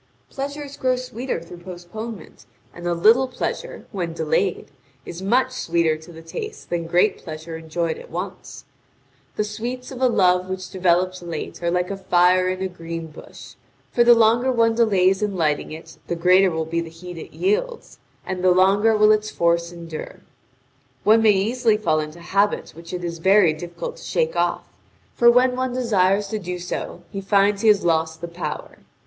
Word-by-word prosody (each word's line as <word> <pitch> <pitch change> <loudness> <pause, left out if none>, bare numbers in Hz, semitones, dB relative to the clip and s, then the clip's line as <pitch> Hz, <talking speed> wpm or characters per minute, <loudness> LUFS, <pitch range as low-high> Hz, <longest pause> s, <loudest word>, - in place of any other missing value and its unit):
Pleasures 285 +1 -6
grow 255 -1 +1
sweeter 250 -3 -4
through 170 +1 -11
postponement; 190 +5 -9 0.3
and 175 0 -7
a 175 - +1
little 225 +9 +5
pleasure, 255 - -5
when 175 -6 -3
delayed, 165 +4 -1 0.3
is 175 +1 -8
much 250 +6 +2
sweeter 170 -9 +1
to 160 +2 -12
the 165 0 -12
taste 425 - -7
than 170 -1 -2
great 180 +5 +2
pleasure 160 0 -8
enjoyed 160 0 -3
at - - -12
once. 170 -7 -7 0.7
The 210 - 0
sweets 240 +5 -5
of 260 -1 -8
a 260 - +5
love 185 -5 +2
which 185 0 -5
develops 185 0 +1
late 170 -1 -6
are 170 - 0
like 180 +2 0
a 195 - -4
fire 185 0 +3
in 185 +1 -3
a - - 0
green 165 -2 -7
bush; - - -12 0.4
for 240 - +4
the 240 0 +7
longer 230 +3 +4
one 230 -2 +3
delays 195 -4 +3
in 205 -2 -1
lighting 155 -3 0
it 160 +1 -10
the 170 - -2
greater 185 +3 +5
will 160 -2 -2
be 170 +1 -1
the 165 - -7
heat 170 +1 -10
it - - -10
yields, 470 +6 -2 0.3
and 185 -1 -4
the 185 - +5
longer 195 +4 +4
will 210 0 +6
its 215 0 +1
force 170 -1 +1
endure. 170 -2 -8 0.8
One 220 +2 +5
may 220 - +5
easily 220 +3 +1
fall 160 -7 +1
into 155 +2 -6
habits 200 +4 0
which 165 +1 -11
it 180 -1 -4
is 170 -1 -4
very 190 -2 +5
difficult 175 - -7
to - - -13
shake 485 0 -1
off, - - 0 0.5
for 235 - +5
when 250 +1 +4
one 255 0 -2
desires 205 -5 +2
to 215 - -2
do 180 -2 -5
so, 175 0 -5
he 195 -1 -4
finds 200 +1 +2
he 225 - +2
has 210 -3 +4
lost 160 -1 0
the 170 - -4
power. 170 -3 -6
185 Hz, 185 wpm, -22 LUFS, 170-220 Hz, 0.8 s, the